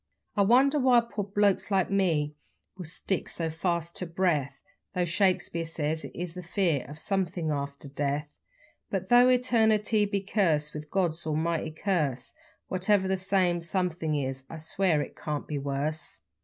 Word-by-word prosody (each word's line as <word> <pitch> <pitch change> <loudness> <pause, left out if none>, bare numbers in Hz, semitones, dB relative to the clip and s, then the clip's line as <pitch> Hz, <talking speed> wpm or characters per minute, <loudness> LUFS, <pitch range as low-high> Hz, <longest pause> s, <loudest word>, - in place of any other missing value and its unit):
I 205 - +3
wonder 265 +8 +5
why 250 -2 +5
poor 220 -3 -4
blokes 200 0 +1
like 195 -2 +1
me 165 -7 +1 0.4
will 185 -2 -7
stick 180 +4 -2
so 165 -1 -2
fast 170 0 -1
ter 180 - -3
breath, 165 -6 0 0.3
Though 180 -1 +2
Shakespeare 180 -1 +1
says 160 -1 -2
it - - -9
is 175 -1 -4
the 180 - -6
fear 175 - 0
of 150 - -9
somethin' 175 -3 -1
after 140 0 -4
death; 145 +1 -2 0.6
But 190 -1 -3
though 245 +1 +7
Eternity 220 -4 +3
be 200 -1 -1
cursed 165 -7 +1
with 150 0 -7
God's 170 -4 0
almighty 160 +1 0
curse 155 -7 -1 0.3
What 185 +2 -3
ever 200 -2 +4
that 190 - +1
same 185 -2 +1
somethin' 170 -3 -1
is 135 -2 -2
I 165 - -7
swear 160 0 +1
it - - -11
can't 150 -2 -4
be 150 -2 -2
worse. 140 +3 -2
175 Hz, 165 wpm, -28 LUFS, 155-195 Hz, 0.6 s, though